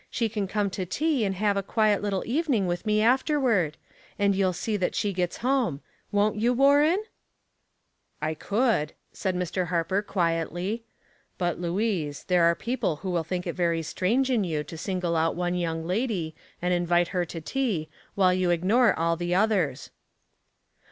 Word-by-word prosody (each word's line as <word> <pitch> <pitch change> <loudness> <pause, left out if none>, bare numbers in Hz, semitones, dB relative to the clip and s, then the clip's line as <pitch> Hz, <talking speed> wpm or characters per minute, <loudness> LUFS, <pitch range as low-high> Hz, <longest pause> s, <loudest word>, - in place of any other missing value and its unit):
She 230 -2 -1
can 205 -2 -2
come 200 0 -1
to 185 - -3
tea, 280 - 0
and 195 -1 -1
have 205 +1 +1
a 200 - +1
quiet 210 +1 +2
little 200 -2 -1
even 290 +3 +1
ing 200 -3 +1
with 175 +4 -3
me 215 0 +3
afterward; 245 - +2 0.4
and 200 -1 +3
you'll 190 -1 +2
see 210 +5 -2
that 185 - -1
slie 205 -1 -1
gets 180 -1 -2
home. 250 - +1 0.3
Won't 205 +1 +2
you, 235 +3 +2
Warren?" 290 - +4 0.6
*' - - -48
I - - -1
could," 205 - 0 0.2
said 190 -2 -2
Mr. 180 0 -1
Harper, 175 +3 0
quietly. 175 +3 -1 0.5
But, 175 -1 -1
Louise, 175 -5 -1
there 180 -2 +3
are 170 0 +4
people 235 -8 -1
who 185 +5 -5
will 170 -2 0
think 180 +2 -3
it 170 - -2
very 170 -2 0
strange 235 - 0
in 230 -5 +2
you 155 -4 -2
to 150 - -9
single 180 0 -2
out 165 0 +1
one 175 0 -1
young 165 -2 -2
lady, 185 -4 -1 0.3
and 180 0 +2
invite 175 0 +2
her 180 -2 0
to 165 0 -7
tea, 200 - -1 0.3
while 185 -2 +4
you 185 -1 +1
ignore 200 +8 +3
all 165 0 +2
the 175 +1 -1
others." 185 -10 +1
185 Hz, 180 wpm, -26 LUFS, 170-220 Hz, 0.6 s, Warren